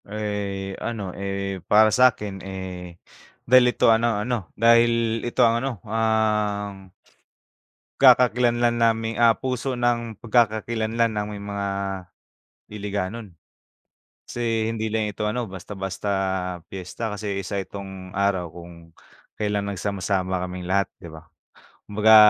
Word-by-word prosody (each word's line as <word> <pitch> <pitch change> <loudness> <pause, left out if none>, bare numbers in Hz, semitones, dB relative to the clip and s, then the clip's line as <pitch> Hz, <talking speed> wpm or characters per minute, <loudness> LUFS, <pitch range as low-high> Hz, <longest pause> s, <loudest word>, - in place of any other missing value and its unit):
Eh, 100 -2 -4
ano, 105 -6 -4
eh, 100 -1 -3
para 110 +1 +6
sa'kin, 105 -6 +3
eh, 90 -2 -7 0.5
dahil 125 +1 +6
ito 120 - +4
ano 115 -1 +2
ano, 105 -4 -2
dahil 115 0 +4
ito 120 +1 +2
ang 115 0 +2
ano 135 +1 -1
ang 105 -3 0 1.1
Pagkakakilanlan 120 -2 +5
naming, 115 0 +1
ah, 115 -1 +6
puso 130 0 -2
ng 120 -2 0
pagkakakilanlan 115 0 +1
naming 105 -1 -4
mga 100 0 -3 1.0
Hiligaynon. 105 +1 -4 1.0
Kasi 115 -2 -1
hindi 110 -1 -2
lang 110 0 0
ito 105 +1 -3
ano 120 +3 -2
basta-basta 95 0 -6 0.6
piyesta, 95 +4 -5
kasi 105 -1 -3
isa 100 +1 -3
itong 95 -1 -9
araw 100 -3 +1
kung 85 +1 -11 0.6
kailan 105 -1 -1
nagsama-sama 95 -1 -1
kaming 90 0 -7
lahat, 100 +1 +2
'di 85 - -11
ba. 80 -1 -12 0.6
Kumbaga 105 +2 +5
105 Hz, 115 wpm, -24 LUFS, 100-115 Hz, 1.1 s, para